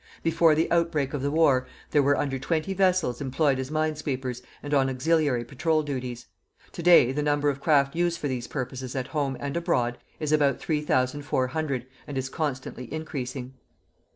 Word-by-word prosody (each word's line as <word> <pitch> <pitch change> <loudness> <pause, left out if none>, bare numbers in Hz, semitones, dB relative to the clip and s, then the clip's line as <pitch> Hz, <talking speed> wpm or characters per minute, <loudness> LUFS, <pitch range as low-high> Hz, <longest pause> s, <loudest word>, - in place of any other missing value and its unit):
Before 165 -1 +4
the 160 +2 +1
outbreak 165 -5 +1
of 145 - -2
the 140 - 0
war 140 -4 +3 0.2
there 145 - +4
were 140 +1 +3
under 135 -2 -1
20 160 +7 -1
vessels 185 -9 +1
employed 135 0 +1
as 130 0 -4
minesweepers 150 -5 -2 0.2
and 145 0 -4
on 135 -2 +3
auxiliary 140 -2 +1
patrol 155 +5 0
duties. 125 -4 -5 0.5
To - - -7
day 170 -7 +6
the 145 +3 -1
number 145 0 +2
of 140 0 -8
craft 140 -2 +3
used 175 0 +1
for 145 - -2
these 125 -3 -3
purposes 130 -1 -5
at 130 -1 -3
home 140 -4 -1
and 140 +1 -4
abroad 120 -8 0 0.2
is 155 -1 -2
about 145 -2 +3
3,400, 145 -2 -1 0.2
and 145 - -5
is 130 0 -2
constantly 130 -5 -4
increasing. 135 -4 -5
145 Hz, 170 wpm, -26 LUFS, 130-155 Hz, 0.5 s, day